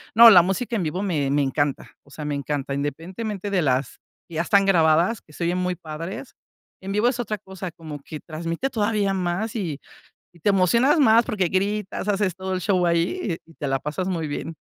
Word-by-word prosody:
no, 230 0 +10
la 180 -3 +9
música 225 +7 -2
en 200 - 0
vivo 175 +5 -2
me 150 -8 0
me 145 0 +2
encanta, 140 +1 -1
o 145 - -24
sea, 150 +1 -7
me 145 - -2
encanta. 140 -1 -3
Independientemente, 185 +8 -4
de 185 -3 +2
las 130 -2 0 0.3
que 165 - -11
ya 160 - +1
están 195 +2 +3
grabadas, 170 +3 +3
que 150 - -21
se 170 - -6
oyen 175 +2 0
muy 180 0 -1
padres, 165 - -7 0.5
en 195 +1 -5
vivo 210 +4 +2
es 245 -1 0
otra 215 -3 -2
cosa, 190 -2 -7
como 155 -3 -9
que 150 +2 -8
transmite 165 +10 -4
todavía 210 -3 +1
más, 190 +5 -2
y 165 -9 -3 0.6
y 170 - -19
te 205 - +2
emocionas 235 - +4
más 230 -2 +6
porque 195 -4 0
gritas, 200 +2 -1
haces 200 -3 +1
todo 190 0 -4
el 185 - -1
show 185 -2 +2
ahí, 170 - 0
y 165 - -18
te 145 - -5
la 135 - +1
pasas 150 +7 -4
muy 170 -4 -2
bien. 160 +3 -5
180 Hz, 215 wpm, -23 LUFS, 155-205 Hz, 0.6 s, no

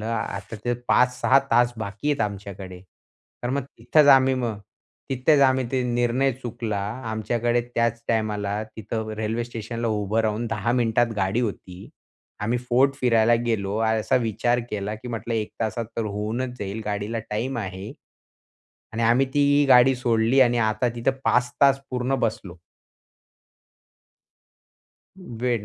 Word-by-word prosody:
P 110 -2 -4
अ - - -14
ते 120 - +1 0.2
5-6 125 +1 +4
तास 120 +1 +4
बाकी 110 +6 -4
आहेत 145 - -1
आमच्याकडे. 100 -3 -5 0.6
तर 120 - -2
मग 140 +1 -1 0.2
तिथेच 145 +6 +4
आम्ही 135 -1 +6
मग 115 -5 -2 0.5
तिथेच 135 +3 +3
आम्ही 130 -1 +3
ते 130 -1 +1
निर्णय 120 +2 +1
चुकला 120 -4 -4 0.3
आमच्याकडे 120 +2 0
त्याच 115 0 0
टाईमाला 105 -2 -1
तिथं 110 0 -4
रेल्वे 110 +2 -2
स्टेशनला 115 0 -5
उभं 105 0 0
राहून 110 +2 -1
10 120 +1 -1
मिनिटात 120 -1 +2
गाडी 95 +3 0
होती. 95 -5 -5 0.5
आम्ही 115 +4 0
फोर्ट 125 +3 +2
फिरायला 120 -2 +4
गेलो 100 -3 -1
असा 110 +1 +1
विचार 120 +2 0
केला 105 0 -3
की 120 +3 -9
म्हटलं 115 0 -4
1 110 -1 -2
तासात 115 +1 -1
तर 115 - -1
होऊनच 110 +5 -3
जाईल 100 +2 -4
गाडीला 105 +2 -3
टाईम 120 +4 -2
आहे. 95 0 -6 1.0
आणि 115 - -2
आम्ही 120 +4 +3
ती 145 - +3
ही 145 +1 +4
गाडी 130 0 +6
सोडली 120 +1 +2
आणि 120 -2 +4
आता 110 +3 0
तिथं 120 +3 +1
5 125 0 +2
तास 135 -1 +6
पूर्ण 125 +1 -1
बसलो. 100 -5 -6 2.8
वेट 120 -4 0
115 Hz, 145 wpm, -24 LUFS, 105-125 Hz, 2.8 s, आम्ही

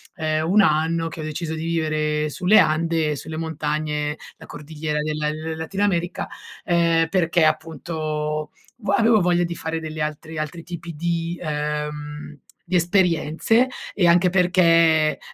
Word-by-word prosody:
ehm, 155 -1 -1
1 210 +3 +5
anno 165 0 +1
che 165 - -10
ho - - -4
deciso 155 +1 -4
di 160 0 -4
vivere 155 -2 0
sulle 185 +7 +4
Ande 160 0 +2
e - - -1
sulle 160 +3 -7
montagne, 150 -2 -2 0.2
la - - -13
Cordigliera 150 0 -4
della 150 0 -1 0.3
Latin 175 +5 -4
America, 175 -3 0 0.3
ehm, 170 -2 +2
perché 170 -2 +2
appunto 155 -1 -2 0.3
vua 200 -4 0
avevo 225 -1 +4
voglia 175 0 +2
di 170 0 -2
fare 160 0 -3
degli 155 0 -6
altri 155 +1 -4
altri 155 +2 -4
tipi 170 -1 -7
di, 170 +1 -2
ehm, 150 -1 -4 0.3
di 180 - -2
esperienze 175 +5 +2 0.3
e 180 -4 +2
anche 175 +2 +5
perché 170 -4 +4
160 Hz, 145 wpm, -22 LUFS, 155-170 Hz, 0.3 s, 1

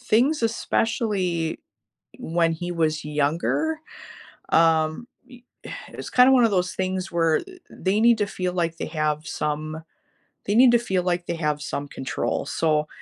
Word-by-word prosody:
things 250 +4 +2
especially, 205 -7 -1 0.6
when 165 0 +1
he 175 +2 -4
was 155 -3 0
younger, 155 - 0 0.7
um, 160 +6 +2 0.2
eh 250 - -13 0.5
it's - - -8
kinda 250 +1 +6
one 255 -2 +5
of 225 - +2
those 180 -1 0
things 185 0 -2
where 165 -2 +2 0.3
they 190 +2 -1
need 235 0 +5
to 205 - +1
feel 185 -2 -3
like 170 -2 -1
they - - -4
have 155 -1 -2
some 155 +1 -3 0.7
they 205 - +1
need 250 +1 +7
to 240 - +6
feel 190 -6 -1
like 175 -1 -1
they - - -3
have 150 -2 -1
some 145 -1 -4
control, 135 -1 -3
so 155 -2 0
175 Hz, 150 wpm, -24 LUFS, 155-220 Hz, 0.7 s, need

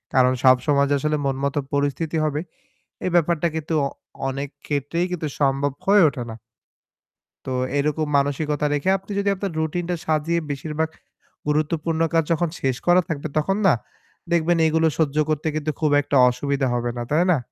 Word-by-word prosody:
কারণ 130 -1 +5
সব 130 -1 +7
সময় 140 -1 +3
যে - - +4
আসলে 150 +2 0
মন-মত 135 +1 -1 0.2
পরিস্থিতি 145 +3 -1
হবে, 150 0 -1 0.6
এ - - +1
ব্যাপারটা 170 -1 +2
কিন্তু 160 0 -2
অ - - -1 0.4
অনেক 135 +1 -4 0.2
ক্ষেত্রেই 145 +4 -1
কিন্তু 165 -3 -2
সম্ভব 140 +1 +2 0.2
হয়ে 200 -1 +6
ওঠে 125 -3 -6
না। - - -7 1.1
তো 130 - -2 0.3
এরকম 150 +2 0
মানসিকতা 145 +1 0
রেখে 145 +6 +1
আপনি 195 +2 -18
যদি 200 0 0
আপনার 195 -1 -3
রুটিনটা 175 +3 -1
সাজিয়ে 160 +2 +1
বেশিরভাগ 155 +3 -2 0.6
গুরুত্বপূর্ণ 155 +2 0
কাজ 165 -1 +4
যখন 165 +1 +1
শেষ 130 -2 0
করা 175 +1 +6
থাকবে, 155 -1 -3
তখন 195 +6 +1
না 170 - +6 0.6
দেখবেন 170 0 +3
এগুলো 160 +1 +3
সহ্য 150 -3 +1
করতে 155 0 -1
কিন্তু 155 0 -1
খুব 155 -2 +2
একটা 145 - -1
অসুবিধা 135 +2 -1
হবে 120 0 -1
না। - - -2
তাই 160 +4 +3
না? 160 - +2
150 Hz, 170 wpm, -23 LUFS, 140-165 Hz, 1.1 s, সব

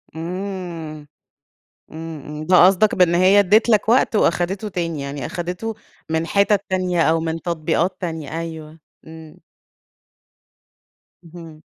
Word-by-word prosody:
إمم، 170 -3 -6 0.8
إمم، 160 -2 -8
إمم، 150 +1 -7
ده 180 0 +6
قصدك 195 +3 +3
بإن 175 -2 +3
هي 190 +3 +5
ادِّت 210 +5 +4
لك 215 -1 +3
وقت، 245 -1 +3
وأخدِته 190 +3 0
تاني، 165 -5 -3
يعني 140 -1 -5
أخِدته 180 - -4 0.4
من 160 +1 -1
حتت 200 +1 +2
تانية 185 -2 0
أو 165 0 +3
من 160 0 -3
تطبيقات 170 +2 -1
تانية، 160 -2 -4
أيوه. 160 -1 -8 0.3
إمم. 160 -1 -13 1.8
اهم. 165 -2 -12
170 Hz, 125 wpm, -20 LUFS, 160-185 Hz, 1.8 s, ده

